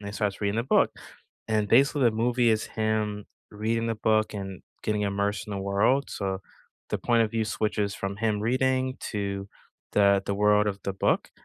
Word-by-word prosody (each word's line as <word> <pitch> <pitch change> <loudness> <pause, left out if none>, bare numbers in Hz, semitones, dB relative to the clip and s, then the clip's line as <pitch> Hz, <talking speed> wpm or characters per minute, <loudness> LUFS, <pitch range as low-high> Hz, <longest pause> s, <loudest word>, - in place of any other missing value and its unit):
and 100 - -7
he 100 - -6
starts 105 -2 -2
reading 100 0 0
the 115 - +1
book - - +3 0.6
and, 105 -1 +1
basically, 140 +5 +4
the 120 - +6
movie 120 +2 +2
is 110 -1 +1
him 110 -1 -2 0.2
reading 115 +2 -1
the 115 - 0
book 110 0 +1
and 95 -2 -6 0.2
getting 105 -1 0
immersed 100 +1 -1
in 105 - -6
the 100 - -3
world, 105 +8 +1
so, 95 -1 -3 0.5
the - - 0
point 120 -1 +3
of 110 - -1
view 115 -1 0
switches 105 -1 -1
from 100 0 -4
him 105 -1 0
reading 130 +3 +1
to 100 -2 -4 0.4
the 100 -1 +4
the 100 - 0
world 105 +1 +3
of 100 -1 -1
the 100 - -1
book 95 - 0
105 Hz, 195 wpm, -27 LUFS, 100-115 Hz, 0.6 s, the